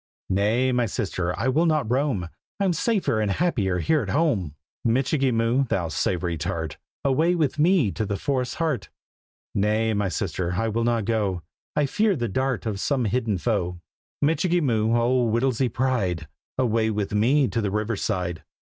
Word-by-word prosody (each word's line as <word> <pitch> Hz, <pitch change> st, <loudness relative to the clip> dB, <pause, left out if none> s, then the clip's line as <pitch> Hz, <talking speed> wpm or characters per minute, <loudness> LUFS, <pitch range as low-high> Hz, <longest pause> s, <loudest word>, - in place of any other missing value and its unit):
"Nay, 110 Hz, +7 st, +2 dB
my 125 Hz, -2 st, +1 dB
sister, 90 Hz, -3 st, -2 dB
I 115 Hz, -, 0 dB
will 155 Hz, +6 st, +3 dB
not 155 Hz, -7 st, +1 dB
roam; 125 Hz, -9 st, 0 dB, 0.3 s
I'm 195 Hz, -3 st, +2 dB
safer 205 Hz, -, +1 dB
and 105 Hz, -, 0 dB
happier 100 Hz, -, +1 dB
here 155 Hz, -, +2 dB
at 100 Hz, -, -5 dB
home," 110 Hz, -, +1 dB, 0.3 s
"Michikee 130 Hz, +3 st, +2 dB
Moo, 115 Hz, +4 st, +2 dB
thou 90 Hz, -8 st, -1 dB
Savoury 85 Hz, 0 st, -1 dB
Tart, -, -, -3 dB, 0.3 s
Away 160 Hz, +6 st, +3 dB
with 150 Hz, -3 st, 0 dB
me 160 Hz, -, +4 dB
to 110 Hz, +1 st, -3 dB
the 100 Hz, -, -2 dB
forest's 130 Hz, 0 st, -1 dB
heart!" 150 Hz, -, -1 dB, 0.6 s
"Nay, 110 Hz, +2 st, +1 dB
my 100 Hz, -2 st, 0 dB
sister, 90 Hz, -2 st, -2 dB
I 115 Hz, +5 st, 0 dB
will 115 Hz, +2 st, 0 dB
not 115 Hz, -2 st, +1 dB
go; 100 Hz, -6 st, 0 dB, 0.3 s
I 150 Hz, -, +3 dB
fear 210 Hz, +7 st, +2 dB
the 120 Hz, -5 st, -1 dB
dart 130 Hz, +3 st, -1 dB
of 105 Hz, -3 st, -2 dB
some 130 Hz, +1 st, 0 dB
hidden 110 Hz, -1 st, 0 dB
foe." 90 Hz, -4 st, -1 dB, 0.4 s
"Michikee 170 Hz, +4 st, +2 dB
Moo, 115 Hz, -5 st, +2 dB
old 120 Hz, 0 st, +2 dB
Whittlesy's 130 Hz, +1 st, +1 dB
pride, 100 Hz, -, -1 dB, 0.3 s
Away 115 Hz, -3 st, +2 dB
with 105 Hz, -2 st, -2 dB
me 130 Hz, +7 st, +3 dB
to 115 Hz, -, -1 dB
the 100 Hz, -, 0 dB
river 105 Hz, +2 st, -1 dB
side!" 90 Hz, -5 st, -2 dB
115 Hz, 170 wpm, -24 LUFS, 100-135 Hz, 0.6 s, me